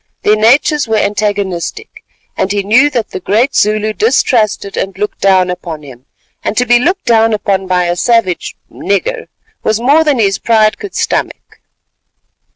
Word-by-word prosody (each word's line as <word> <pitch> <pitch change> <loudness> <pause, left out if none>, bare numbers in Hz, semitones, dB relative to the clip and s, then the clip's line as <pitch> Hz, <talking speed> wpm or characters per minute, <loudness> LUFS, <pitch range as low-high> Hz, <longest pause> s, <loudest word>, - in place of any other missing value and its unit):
Their 210 - +4
natures 265 +6 +2
were 220 -1 0
antagonistic, 205 - -3 0.3
and 190 - -1
he 205 -1 -1
knew 240 +9 +4
that 240 -6 -3
the - - -5
great 220 +9 0
Zulu 215 +1 +1
distrusted 220 - 0
and 190 -1 -4
looked 210 +1 -4
down 185 -2 +3
upon 170 -4 -7
him, 130 -1 -14 0.4
and - - -3
to 250 - +2
be 240 0 +4
looked 355 +10 -1
down 225 -2 +3
upon 195 -2 -1
by 180 -1 +1
a 175 0 -1
savage 210 -2 0 0.2
"nigger" 465 - -2 0.3
was 220 0 0
more 285 +7 +3
than 295 -4 +1
his 195 -4 +1
pride 220 -2 +2
could 405 - -8
stomach. - - -3
215 Hz, 160 wpm, -13 LUFS, 195-245 Hz, 0.4 s, Their